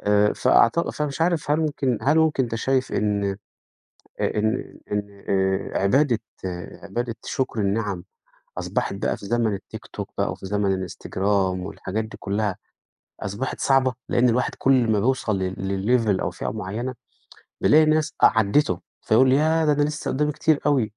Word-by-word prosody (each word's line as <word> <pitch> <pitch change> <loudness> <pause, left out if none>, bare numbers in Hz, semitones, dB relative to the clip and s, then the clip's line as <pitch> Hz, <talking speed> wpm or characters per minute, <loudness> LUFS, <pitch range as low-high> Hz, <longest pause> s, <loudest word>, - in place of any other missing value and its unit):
آآ، 105 0 +3
فأعتق 145 +9 +3
فمش 150 0 -3
عارف 165 -3 +1
هل 150 +2 +3
ممكن 140 -6 0
هل 150 +4 +3
ممكن 155 -4 +3
أنت 115 -1 -5
شايف 130 +3 0
إن 105 -1 0 1.0
آآ، 105 - 0
إن 110 +1 -2
إن 100 -1 -4
آآ، 95 0 0
عبادة 125 +3 +3 0.6
عبادة 115 +4 -3
شُكر 130 -4 -2
النعم 100 -3 -1 0.5
أصبحت - - -2
بقى - - -1
في - - -11
زمن 110 -2 +1
الTikTok - - -8
بقى - - 0
وفي - - -8
زمن 95 -2 0
الInstagram - - -10 0.5
والحاجات 105 +2 -4
دي 110 - -10
كُلّها 100 -1 -1 0.6
أصبحت 100 +7 -4
صعبة 135 -2 +3
لإن 125 +1 +3
الواحد 125 +2 +1
كل 130 -4 +3
ما 105 - +2
بيوصل 115 -4 +1
ل 95 0 -2 0.5
لlevel 95 -2 +2
أو - - -1
فئة - - -5
معيّنة 110 +5 -4 0.7
بيلاقي 155 +1 +6
ناس 155 0 +1
أ - - +11
عدّته 105 -3 +2 0.2
فيقُول 130 +4 +4
ياه! 160 +3 +3
ده 150 - +4
أنا 145 0 +2
لسه 150 +1 -2
قدّامي 150 +2 +1
كتير 150 0 +2
أوي. 140 -5 +3
115 Hz, 155 wpm, -24 LUFS, 100-145 Hz, 1.0 s, أ